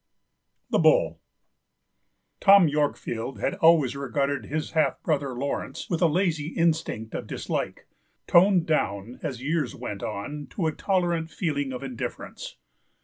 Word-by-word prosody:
201THE - - +4
BULL - - +4 1.2
Tom 195 -3 +7
Yorkfield 145 -4 -2
had - - 0
always 160 -8 +4
regarded 140 -3 -1
his 155 +2 -3
half 155 -4 +1
brother, 140 -5 -1
Laurence, 140 +7 -4
with 170 - 0
a 170 - +6
lazy 165 -2 0
instinct 160 -10 0
of - - -5
dislike, - - -4 0.4
toned 180 -1 +5
down, 115 -6 -1
as 130 -2 -5
years 155 +2 -1
went 100 -1 -6
on, 145 +8 -5
to 180 - -3
a 160 - +2
tolerant 175 -2 0
feeling 145 -5 -2
of 130 +1 -6
indifference. 130 -4 -6
150 Hz, 135 wpm, -26 LUFS, 135-170 Hz, 1.2 s, Tom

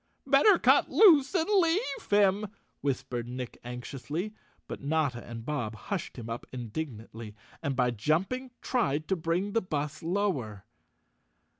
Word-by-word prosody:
"Better 285 +9 +6
cut - - +4
loose 330 -7 +6
and 325 -3 +2
leave 400 +4 +1
him," 205 0 +3 0.3
whispered 130 -3 -2
Nick 125 0 -6
anxiously, 135 - -5 0.3
but - - -6
Notta 145 -4 0
and 115 -1 -8
Bob 125 -7 -2
hushed 135 - -5
him 115 -2 -7
up 115 +1 -5
indignantly 115 -3 -6 0.3
and 140 -1 -1
by 125 -1 +2
jumping 175 - 0
tried 155 - 0
to 190 - +3
bring 170 +4 -1
the 230 - +2
bus 150 -5 -3
lower. 155 - -1
150 Hz, 135 wpm, -29 LUFS, -, 0.3 s, Better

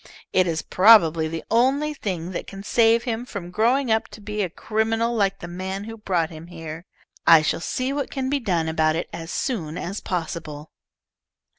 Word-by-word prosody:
It 185 -1 +4
is 165 -1 -1
probably 170 -6 +5
the 165 0 -5
only 270 +6 +2
thing 185 - -4
that 180 - -5
can 195 0 -9
save 230 +1 +3
him 235 -1 -2
from 200 -8 -7
growing 240 +5 +2
up 220 0 +2
to - - -12
be 210 0 -4
a 185 - -1
criminal 225 +5 -1
like 195 -3 +1
the 175 - -8
man 190 +3 -5
who 225 +1 -7
brought 180 -7 -1
him 160 +1 -10
here. 165 -1 -8 0.4
I 165 -2 +8
shall 155 - 0
see 255 +8 -2
what 285 -1 -2
can 265 -1 -3
be 280 +1 0
done 175 -9 0
about 160 -1 +1
it, 170 - -2
as 165 -1 -6
soon 180 - -3
as 195 +4 -4
possible." 160 -4 -5
195 Hz, 190 wpm, -23 LUFS, 165-225 Hz, 0.4 s, I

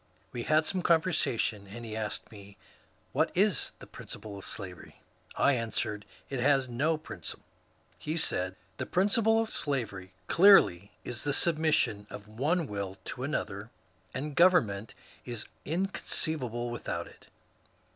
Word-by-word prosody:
We 120 - -4
had 155 +5 +3
some 185 +2 -1
conversation, 160 - +2
and 115 +4 -8
he 110 -1 -5
asked 110 -1 -3
me, 100 -1 -13
*^ - - -28 0.5
What - - +2
is 200 -3 +3
the - - -11
principle 105 -2 -9
of 100 - -8
slavery? 90 -3 -7 0.2
" - - -21
I 140 - +4
answered, 110 -3 -2 0.2
*^ - - -33
It 135 - -3
has 135 0 +3
no 145 +7 +1
principle." 155 - -8 0.5
He 155 +2 -3
said, 95 - 0 0.2
The - - -3
principle 220 +4 +3
of 225 -1 -1
slavery 100 -10 -2
clearly 170 - +6
is 120 -1 -5
the 145 - 0
submission 155 -11 +2
of 105 0 -9
one 150 +11 0
will 100 -5 -4 0.2
to - - -9
another, - - -3 0.4
and 145 +1 -4
government 115 - +4 0.3
is 120 -3 -5 0.2
incon 185 +6 0
ceivable 120 -6 -1
without 85 -7 -3
it." - - -17
125 Hz, 150 wpm, -30 LUFS, 105-160 Hz, 0.5 s, clearly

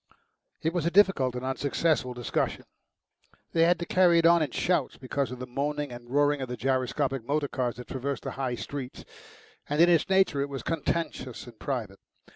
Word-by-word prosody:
It 160 +1 0
was 170 -2 0
a - - +4
difficult 175 -10 +3
and 125 +1 -4
unsuccessful 135 0 0
discussions. 120 -2 -2 0.9
They 165 0 +4
had 175 +1 +4
to 170 - -4
carry 175 -1 +4
it 165 - +3
on 170 0 +6
in 150 - 0
shouts 165 +1 0
because 135 +1 -2
of 125 - -6
the 125 - -6
moaning 145 +2 -2
and 120 0 -10
roaring 145 +1 +2
of 130 - -4
the 125 - -4
gyroscopic 130 -1 0
motor 145 +4 0
cars 125 -3 -2
that 125 - -9
traversed 135 -1 -3
the - - -4
High 130 -2 -2
Street, 135 +1 -7 0.6
and 150 +1 -1
in 170 +1 +7
its 170 -1 +3
nature 190 -7 +3
it 140 - -2
was 135 -2 -5
contentious 165 -5 -3
and 120 -3 -14
private. 110 -8 -4
140 Hz, 195 wpm, -28 LUFS, 125-165 Hz, 0.9 s, in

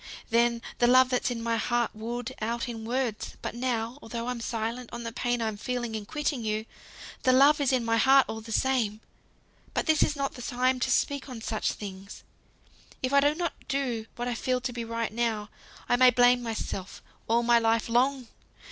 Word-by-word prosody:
Then, 235 0 +2 0.2
the 240 - +4
love 255 +1 +6
that's 250 - +1
in 235 -2 -4
my 230 0 0
heart 240 +1 0
would 235 +3 -5
out 235 +3 -2
in 225 -2 -6
words; 240 -2 -2
but - - -3
now, 240 +1 -2
though 235 +1 -5
I'm 245 -2 -3
silent 230 +1 -3
on 235 0 -6
the 230 - -4
pain 240 0 -1
I'm 220 -2 -2
feeling 240 0 -3
in 215 -2 -5
quitting 295 -5 -2
you, 215 0 -1 0.6
the 255 - +4
love 285 +4 +6
is 275 - +2
in 250 -3 +1
my 230 0 +2
heart 270 +3 +6
all 220 0 -5
the 225 +1 -10
same. 230 -4 +1 0.8
But - - 0
this 315 -2 +3
is 300 - +2
not 275 -1 -2
the 245 - -9
time 255 +1 0
to 260 - 0
speak 280 +2 0
on 250 -3 -7
such 220 0 -1
things. 195 -1 -9 0.8
If 255 +2 0
I 280 - +7
do 290 +2 +3
not 345 0 -2
do 245 -5 -2
what 240 0 -3
I 245 - -1
feel 255 +2 -1
to 250 0 -3
be 235 -1 -4
right 230 -1 -3
now, 220 -2 -1 0.4
I 245 - +3
may 255 0 +7
blame 245 0 +4
myself 220 -4 -5 0.2
all 235 +1 +3
my 235 0 +5
life 225 0 +1
long! 250 +2 +1
240 Hz, 205 wpm, -28 LUFS, 225-255 Hz, 0.8 s, I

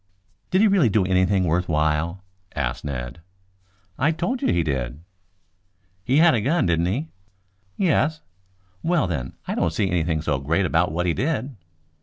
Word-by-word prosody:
"Did 185 - +3
he 220 - +6
really 190 - +4
do 100 -2 +2
anything 95 +1 +2
worth 90 +2 0
while?" 80 +4 0 0.3
asked 65 -4 -2
Ned. 65 0 -5 0.8
"I 145 - +3
have 160 0 0
told 245 +10 -1
you - - +2
he 85 -1 +2
did." 70 -1 -3 1.0
"He 130 +8 +2
had 165 +1 +6
a 115 - +1
gun, 145 +6 +1
didn't 85 0 +1
he?" 135 - -2 0.7
"Yes." 160 -3 +1 0.6
"Well, 170 -2 +1
then, 70 -8 -4
I - - -1
don't 85 - 0
see 95 0 0
anything 80 -3 0
so 75 -3 0
great 80 +8 0
about 85 0 +1
what 90 +2 -1
he 85 - +1
did." 135 - -2
90 Hz, 170 wpm, -23 LUFS, -, 1.0 s, he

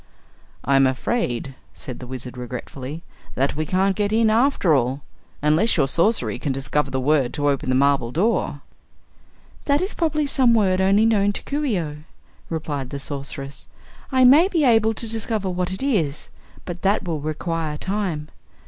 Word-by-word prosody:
"I'm 135 0 +4
afraid," 130 - -2 0.2
said 125 - -7
the 125 - -9
Wizard 125 0 -7
regretfully, 130 +5 -7 0.3
"that 135 +2 0
we 155 0 -2
can't 190 +2 +1
get 205 0 0
in, 220 0 +3
after 230 - +3
all. 130 +1 0 0.4
Unless 155 +10 +3
your 135 -4 +3
sorcery 135 - +1
can 140 - -2
discover 135 +2 -1
the 130 - -2
word 135 -2 +1
to 145 -1 0
open 140 -1 0
the 130 - +2
marble 135 -3 +2
door." 175 - 0 1.0
"That 285 0 +3
is 375 +4 -2
probably 310 -3 0
some 255 -4 +3
word 190 -4 +2
only 200 +3 +4
known 205 -3 +3
to - - -5
Coo 290 +1 -2
ce 220 -7 +1
oh," 155 -4 -4 0.5
replied 145 -5 -4
the 140 - -5
Sorceress. 140 0 -6 0.4
"I 260 -1 +4
may 290 +8 +7
be 340 -6 +1
able 225 -2 +4
to 230 - -4
discover 220 -3 -2
what 180 0 -2
it 190 +7 -5
is, 170 - -1 0.4
but 175 -1 -6
that 200 +2 +1
will 160 -3 -2
require 155 0 -3
time. 185 -5 -3
165 Hz, 170 wpm, -22 LUFS, 140-220 Hz, 1.0 s, may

